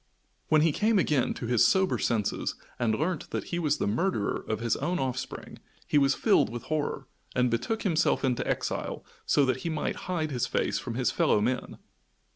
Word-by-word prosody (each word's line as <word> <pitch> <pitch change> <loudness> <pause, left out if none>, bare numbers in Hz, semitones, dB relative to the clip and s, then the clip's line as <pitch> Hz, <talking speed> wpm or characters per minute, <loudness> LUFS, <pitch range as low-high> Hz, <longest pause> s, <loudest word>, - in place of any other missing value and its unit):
When 155 -1 +4
he 160 0 +4
came 215 +7 +2
again 150 -8 +1
to - - -5
his 120 -1 +3
sober 190 -1 +3
senses, 110 -4 -1 0.2
and 115 -3 +2
learnt 175 +4 -2
that - - -3
he 170 - +1
was 150 -3 +1
the - - -1
murderer 110 - 0
of 110 -1 -1
his 115 0 0
own 180 +1 -1
offspring 130 -3 -4 0.3
he 150 - +3
was 140 0 +3
filled - - +3
with 120 0 -6
horror, 150 -3 -2 0.3
and 125 -2 +2
betook 120 - -1
himself 165 -6 +2
into 125 -2 0
exile - - -2 0.2
so 145 - +4
that 130 - +1
he 165 - -4
might 155 - -2
hide 160 -4 -1
his 125 -2 -1
face - - 0
from 120 -3 -5
his 125 0 +1
fellow - - +3
men. 125 +4 -2
135 Hz, 195 wpm, -28 LUFS, 120-160 Hz, 0.3 s, When